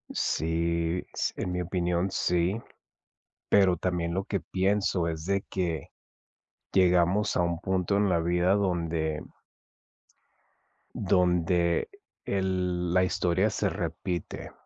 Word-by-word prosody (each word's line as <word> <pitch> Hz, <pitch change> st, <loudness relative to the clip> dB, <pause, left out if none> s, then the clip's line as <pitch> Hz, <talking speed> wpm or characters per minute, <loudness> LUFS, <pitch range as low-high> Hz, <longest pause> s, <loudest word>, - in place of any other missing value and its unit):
Sí, 85 Hz, +1 st, 0 dB
s -, -, -1 dB
en 90 Hz, -, -2 dB
mi 90 Hz, 0 st, -1 dB
opinión, 90 Hz, 0 st, 0 dB
sí. 90 Hz, +3 st, +1 dB, 0.9 s
Pero 95 Hz, -3 st, +5 dB
también 85 Hz, -1 st, -1 dB
lo 95 Hz, +1 st, -1 dB
que 100 Hz, -2 st, -2 dB
pienso 95 Hz, -1 st, 0 dB
es 80 Hz, -1 st, -4 dB
de 100 Hz, 0 st, +1 dB
que 85 Hz, -6 st, -3 dB, 0.8 s
llegamos 90 Hz, +2 st, +3 dB
a -, -, +3 dB
un 85 Hz, -1 st, 0 dB
punto 95 Hz, +1 st, 0 dB
en 100 Hz, -1 st, +2 dB
la 85 Hz, -2 st, +2 dB
vida 90 Hz, +2 st, +2 dB
donde 85 Hz, -5 st, -1 dB, 1.7 s
donde 90 Hz, -3 st, +2 dB, 0.4 s
el 90 Hz, -2 st, -1 dB
la 90 Hz, 0 st, +4 dB
historia 90 Hz, +3 st, +1 dB
se -, -, 0 dB
repite, 90 Hz, -1 st, -4 dB
90 Hz, 115 wpm, -28 LUFS, 85-95 Hz, 1.7 s, Pero